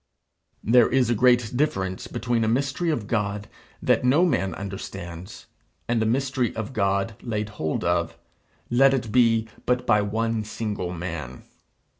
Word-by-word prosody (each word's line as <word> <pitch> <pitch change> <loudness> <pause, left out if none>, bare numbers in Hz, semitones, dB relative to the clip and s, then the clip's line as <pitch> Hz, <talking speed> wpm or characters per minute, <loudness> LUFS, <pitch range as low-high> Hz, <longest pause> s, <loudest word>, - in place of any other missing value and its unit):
There 120 +1 +5
is 125 -2 +2
a - - +4
great 120 0 +3
difference 95 -10 -1
between 115 +1 -1
a - - +1
mystery 140 +8 0
of 120 -10 -1
God 105 -2 -2 0.4
that - - +3
no 140 +8 +4
man 95 - 0
understands, 95 -1 -7 0.4
and 120 -1 +1
a 110 - +1
mystery 130 0 0
of 110 +2 -5
God 100 0 0
laid 105 -2 -3
hold 80 -8 -3
of, - - 0 0.5
let 135 +3 +5
it 120 -5 -3
be 115 -2 +3 0.2
but 125 0 +1
by 105 -3 +4
one 110 +2 -1
single 105 -4 -4
man. 85 -7 -6
110 Hz, 150 wpm, -24 LUFS, 100-125 Hz, 0.5 s, There